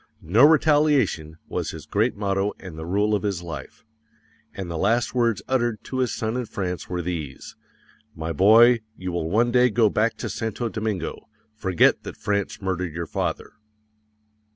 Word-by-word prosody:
"No 100 - +4
Retaliation" 145 - +3
was - - -3
his - - -8
great 110 +5 0
motto 100 0 -1
and 95 -4 -10
the 80 +1 -7
rule 105 +4 +1
of 105 - +1
his 100 -4 -2
life; 85 +6 -8 0.7
_AND 95 - -4
THE 85 - -5
LAST 115 +3 +1
WORDS 115 -5 +1
UTTERED 120 -4 0
TO 130 - -4
HIS 125 -3 +1
SON 110 0 -2
IN 125 -2 -3
FRANCE 90 -3 -4
WERE 90 -1 -3
THESE: 80 -6 -5 0.6
"My 80 +1 -4
boy, 115 +8 +6 0.2
you 95 0 -4
will 85 -2 -2
one 115 +6 +2
day 125 +1 +4
go 110 -2 +3
back 110 +2 +1
to - - -4
Santo 115 +1 -3
Domingo; 105 -3 -4 0.2
forget 95 -5 +2
that - - -9
France 100 -1 -2
murdered 90 -3 -2
your 85 0 -3
father." - - -3
105 Hz, 170 wpm, -24 LUFS, 90-120 Hz, 0.7 s, boy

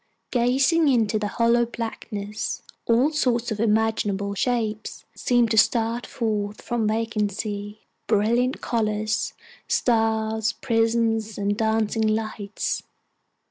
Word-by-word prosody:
Gazing 265 +7 +3
into 225 -5 +2
the 210 - -1
hollow 235 +2 +3
blackness, 220 -3 -5 0.2
all 245 +6 +4
sorts 245 -5 0
of 215 - -3
imaginable 210 -2 +1
shapes 220 -1 -2
seemed 240 -2 +2
to 220 - +5
start 230 +2 +2
forth 210 -3 -2
from 235 -3 -1
vacancy 210 -1 -2 0.3
brilliant 235 +4 +2
colors, 215 -2 -1 0.3
stars, 220 -1 +1
prisms, 225 -3 0
and 205 0 0
dancing 220 0 +1
lights. 215 -1 -2
220 Hz, 100 wpm, -24 LUFS, 210-235 Hz, 0.3 s, to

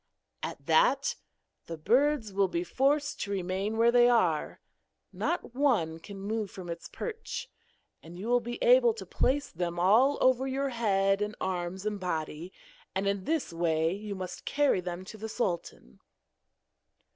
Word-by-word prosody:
At - - -6
that - - +3 0.5
the 165 - -5
birds 245 - +2
will 195 0 +3
be 170 -1 -2
forced 285 - +1
to 200 - -3
remain 195 +2 -2
where 230 +1 +5
they 240 0 +6
are 180 -11 +1 0.5
not 345 -8 -2
one 230 - +1
can 195 +4 -10
move 210 +1 -2
from 180 -2 -7
its 170 - -7
perch; 455 -1 -6 0.5
and 170 +2 -11
you 200 +5 -6
will 245 +1 +4
be 240 0 -5
able - - +6
to - - -8
place 280 +3 0
them 175 0 -3
all 225 +10 +4
over 260 +1 +3
your 275 +1 -1
head 195 -4 +1
and 210 +1 -2
arms 185 +1 -3
and 210 -1 -2
body, 165 -1 -4 0.4
and 195 +1 0
in 200 -1 -1
this 315 - -1
way 165 -1 +1
you 205 +1 -5
must 185 -1 -6
carry 285 -9 +2
them 180 +1 -5
to 215 +2 -10
the 220 +1 -5
sultan.' 170 - -4
205 Hz, 160 wpm, -29 LUFS, 180-255 Hz, 0.5 s, they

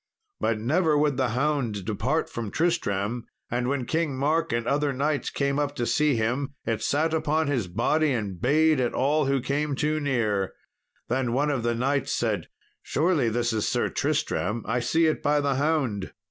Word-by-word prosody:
But 115 - +1
never 155 +6 +2
would 145 -2 +2
the 130 -2 +1
hound 125 -6 -1
depart 125 +10 0
from 115 -3 -5
Tristram; 115 - -1 0.2
and 120 +1 0
when 135 -2 -1
King 160 -3 -1
Mark 155 +5 +1
and 115 0 -1
other 145 +2 +1
knights 140 0 -1
came 140 0 0
up 145 -1 -1
to 120 - -1
see 150 +2 +2
him, 125 +5 -1
it 115 -1 -1
sat 155 +3 +1
upon 160 0 +1
his 130 -9 -1
body 140 - +1
and 100 -8 -3
bayed 155 +2 +3
at 125 -2 0
all 145 +3 +2
who 135 0 +2
came 140 +3 -1
too 155 +2 0
near. 110 -9 0 0.5
Then 120 -1 0
one 145 +3 +1
of 135 -4 -1
the 120 0 0
knights 135 +4 0
said, 105 -8 -1 0.3
"Surely 155 -6 +1
this 120 +1 0
is 110 -2 0
Sir - - 0
Tristram; 110 +1 -1
I 120 +3 0
see 160 +7 +2
it 155 - +1
by 145 0 +2
the 140 -1 +1
hound." 135 -9 0
135 Hz, 185 wpm, -26 LUFS, 115-150 Hz, 0.5 s, bayed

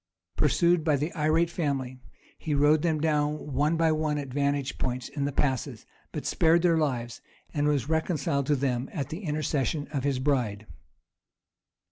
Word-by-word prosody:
Pursued 170 +3 +3
by 155 -2 +3
the 150 +4 -2
irate 160 +1 +2
family, 135 -6 -2 0.4
he 150 -2 -2
rode 145 +2 +4
them 160 -2 +1
down 150 -1 0
one 150 +4 +2
by 165 -1 +3
one 155 -1 0
at 140 -2 -4
vantage 140 0 -1
points 125 -1 -2
in 140 -1 -3
the 145 - -1
passes, 130 -3 -1 0.3
but - - -5
spared 165 +1 +3
their 170 -2 +4
lives, 120 -6 -2 0.3
and 145 -1 +1
was 145 -4 +1
reconciled 155 -4 0
to 150 - +3
them 130 -1 -1
at 140 -2 -3
the 160 +3 -5
intercession 150 - -1
of 135 -3 -1
his 140 -2 +1
bride. 125 -7 0
145 Hz, 165 wpm, -27 LUFS, 135-155 Hz, 0.4 s, rode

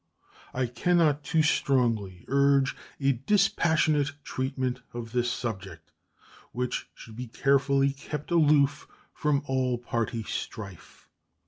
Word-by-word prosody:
I 130 0 +1
can 125 +10 +1
not 150 -3 +3
too 160 0 +2
strongly 115 - +1
urge 140 -1 +3 0.2
a 140 -1 +3
dispassionate 155 - +2
treatment 130 -1 -2
of 115 -2 -6
this 120 0 +1
subject, 95 -10 -6 0.6
which 125 0 -3
should 110 - -12
be 125 +2 -6
carefully 140 +2 +2
kept 150 +3 -7
aloof 150 -3 +3 0.3
from 145 -1 0
all 130 -2 0
party 115 -1 -2
strife. 100 -4 -7
135 Hz, 115 wpm, -27 LUFS, 120-145 Hz, 0.6 s, not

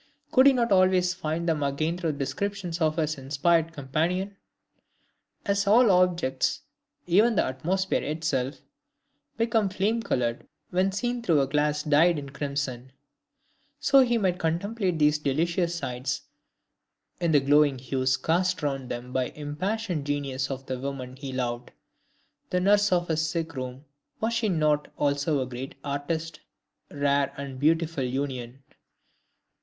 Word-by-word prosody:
Could 260 +1 +6
he 275 - +7
not 235 -3 +1
always 185 -1 +4
find 170 -1 -3
them 160 -3 +1
again 145 +4 0
through 170 -3 -2
the - - -9
descriptions 180 +3 -3
of 155 -1 +2
his 155 -2 -1
inspired 160 +5 +1
companion? 165 +7 -2 1.1
As 200 0 +1
all 225 +1 +6
objects, 175 -8 +1 0.4
even 210 +7 +4
the - - +3
atmosphere 180 +9 -1
itself, 150 -3 -2 0.7
become 225 -3 +1
flame 205 +5 0
colored 120 - -2 0.2
when 185 +2 +2
seen 240 +5 -2
through 165 -9 +3
a 135 - +3
glass 150 +2 0
dyed 155 +3 +4
in 140 -2 -6
crimson, 140 -3 -4 0.9
so 275 0 +5
he 240 -3 +4
might 185 -4 0
contemplate 180 +3 -1
these 150 0 +3
delicious 170 +5 0
sites 130 -4 -3 1.0
in 170 -2 +1
the 145 - +6
glowing 145 0 +4
hues 130 +1 0
cast 180 +5 0
around 135 -3 -2
them 120 +1 -6
by 130 -1 +1
the - - -16
impassioned 175 +2 -3
genius 140 -2 -2
of 135 -1 -5
the 130 -1 -4
woman 130 -1 -5
he 135 0 -7
loved. 120 -2 -3 0.8
The 180 - +1
nurse 205 +2 +3
of 175 -1 +2
his 160 0 +1
sick 165 0 -3
room 130 +2 -6 0.3
was 225 +1 0
she 230 -2 +1
not 155 -4 +1
also 145 0 +1
a - - -1
great 130 +1 -7
artist? 155 +3 -3 0.5
Rare 140 -1 +1
and 140 -2 -6
beautiful 160 0 +1
union! 130 -1 -4
155 Hz, 145 wpm, -27 LUFS, 135-180 Hz, 1.1 s, he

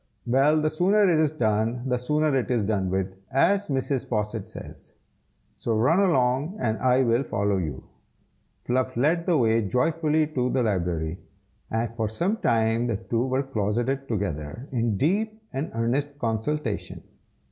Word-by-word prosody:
"Well, 135 +6 +3
the 155 0 +1
sooner 195 +6 +3
it 165 -3 +3
is 155 -1 +3
done 115 -3 0
the 125 -1 0
sooner 150 +3 +1
it 130 - 0
is 120 -4 +1
done 100 -3 0
with, 95 0 -1 0.2
as 200 +10 +3
Mrs. 135 -1 -1
Posset 105 -2 -2
says. - - -11 0.6
So 115 - -2
run 130 - +3
along, 145 -1 +2
and 110 -2 -1
I 130 +1 +3
will 120 +1 +2
follow 100 -6 0
you." 75 -8 -4 0.8
Fluff 130 0 0
led 165 +7 +1
the 175 -3 +3
way 115 -3 +3
joyfully 155 - +1
to 130 -5 -1
the 130 -1 +1
library, 90 -5 -1 0.5
and 115 +1 -2
for 110 -2 -1
some 175 - -1
time 115 - +1
the 115 -4 0
two 115 +3 -1
were 130 +1 0
closeted 120 +3 -1
together, 100 - -3
in 115 -5 0
deep 215 - 0
and 135 +4 -2
earnest 135 +5 -1
consultation. 115 0 -2
125 Hz, 160 wpm, -25 LUFS, 110-150 Hz, 0.8 s, Well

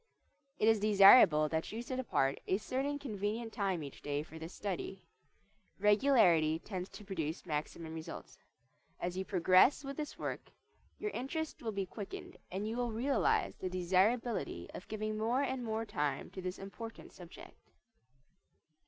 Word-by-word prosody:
It 215 - +2
is 225 -1 +5
desirable 200 -6 +7
that 160 +1 -2
you 225 +3 -4
set 255 +1 -4
apart 135 - +1
a 190 - +2
certain 270 +7 -2
convenient 225 -3 -3
time 195 -7 -1
each 140 - -9
day 145 0 -2
for 160 +1 -11
this 165 +2 -7
study. 190 -1 -5 0.7
Regularity 200 - +4
tends 185 +1 -6
to 210 - -11
produce 165 -5 -4
maximum 160 +1 -4
results. 160 -1 -8 0.6
As 175 0 -3
you 190 - -1
progress 185 - +4
with 275 0 -6
this 300 -2 -5
work - - -5 0.5
your 420 - -3
interest 315 +4 -4
will 225 - -2
be 200 -2 -2
quickened 200 +2 -8
and 195 +3 -3
you 225 +2 -3
will 245 -1 -1
realize 285 - +1
the 185 - -3
desirability 185 - +1
of - - -9
giving 215 0 -3
more 240 +5 +1
and 260 -2 -2
more 225 0 -2
time 145 -8 -2
to 190 - -7
this 180 0 -4
important 225 +4 -9
subject. 175 -1 -13
205 Hz, 155 wpm, -34 LUFS, 175-235 Hz, 0.7 s, desirable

